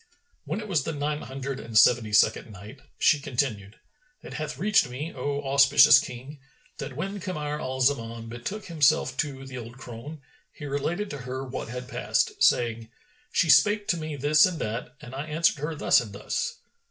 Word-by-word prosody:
When 160 +8 -3
it 215 - -7
was 175 -7 +1
the 160 - -4
Nine 150 +1 -2
Hundred 135 0 -5
and 115 -3 -3
Seventy 110 -2 +5
second 110 +1 +3
Night, 105 +7 -12 0.2
She 150 - +4
continued, 115 -7 -3 0.5
It - - -9
hath 155 -4 -5
reached 200 -4 +2
me, 145 +7 -6
O 140 +2 -3
auspicious 135 -2 +6
King, 130 +4 -8 0.4
that 135 -2 -6
when 195 +7 -4
Kamar 150 -5 -4
al 130 0 -4
Zaman 115 -4 0
betook 120 - -6
himself 145 -5 +2
to 135 -2 -3
the 130 -1 -7
old 120 +1 -10
crone, 135 +5 -9 0.3
he 145 - -10
related 160 +8 -2
to 145 - -6
her 130 +1 -5
what 130 - -5
had 125 +2 -7
passed, - - -1
saying, 115 -2 +2 0.4
"She 170 - +2
spake 205 +9 +4
to 175 - +2
me 155 -2 -5
this 145 +2 +4
and 180 -2 -4
that, 115 0 -5
and 125 -3 -11
I 140 +3 -5
answered 155 -1 +1
her 155 +2 -3
thus 145 - +4
and 110 -4 -8
thus. 470 - -3
135 Hz, 185 wpm, -26 LUFS, 125-155 Hz, 0.5 s, auspicious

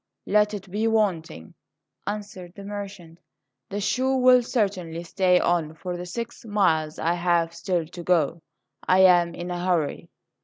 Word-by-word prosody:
"Let 210 0 +2
it 195 -2 -9
be 215 +3 0
wanting," 180 - -1 0.5
answered 200 -4 -6
the 200 - -9
merchant; 195 -5 -8 0.5
"the 200 - -3
shoe 260 +6 +1
will 255 -1 +6
certainly 190 -8 -2
stay 180 +1 +2
on 165 -3 0
for 180 +2 -5
the 175 0 -6
six 235 +5 -6
miles 180 -8 +1
I 165 +2 0
have 170 -1 +1
still 175 0 -1
to 175 +2 -10
go. 170 -2 +1 0.5
I 185 +1 +5
am 175 -2 +5
in 175 +1 -5
a 175 0 -3
hurry." 175 -5 -1
180 Hz, 155 wpm, -25 LUFS, 170-205 Hz, 0.5 s, will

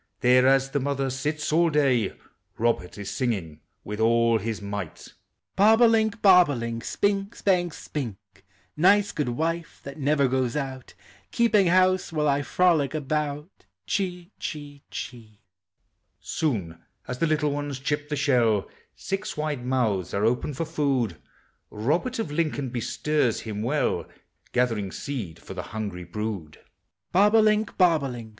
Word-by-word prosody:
There 125 +1 +5
as 135 0 +3
the 145 - 0
mother 135 -1 -1
sits 150 +3 -2
all 170 +1 +4
day, 135 -8 +2 0.5
Robert 115 -6 0
is 100 -1 -5
singing 95 - -2 0.2
with 105 +1 -6
all 115 0 +3
his 110 +1 -3
might: 100 -5 -6 0.4
Bob 215 +3 +5
o' - - +9
link, 220 -1 +2
bob 180 -4 +7
o' 145 - -1
link. 115 -1 -4
Spink', 200 +5 -1
spank, 180 -3 +1
spink; 120 -10 -5 0.6
Nice 200 +5 +4
good 150 -5 -2
wife, 165 +6 -3
lliat 140 +1 -8
never 140 -1 +2
goes 130 -2 0
out. 135 -3 -5 0.3
Keeping 215 -5 +3
house 185 +1 +3
while 155 -2 0
1 140 -1 +2
frolic 160 -6 +2
about. 150 - -3 0.2
Cbee, 180 -2 -2
chee, 145 -2 -6
chee. 110 -4 -8 0.8
Soon 95 - -2 0.3
as 125 0 -5
the 165 - +2
little 150 -1 +1
ones 145 -1 -3
chip 145 +2 -2
the 150 - -1
shell 120 -7 +2 0.3
Six 195 -4 -4
wide 150 -4 -2
niouihs 115 -9 0
are 100 +2 +1
open 125 +5 0
for 165 - -2
Pood: 135 - 0 0.5
Robert 160 - -1
of 225 -10 -3
Lincoln 150 -4 -1
bestirs 125 +1 0
him 105 -2 -5
well, 140 +7 0 0.4
Gathering 115 -6 0
seed 105 - -5
for - - -10
the 90 - -4
hungrj 105 +1 -5
in 90 -1 -8
I. 100 -5 -5 0.5
Bob 205 +4 +4
oMink, 215 -1 +3
bob 170 -5 +4
o' - - -1
link. 120 -3 -7
140 Hz, 150 wpm, -25 LUFS, 115-165 Hz, 0.8 s, o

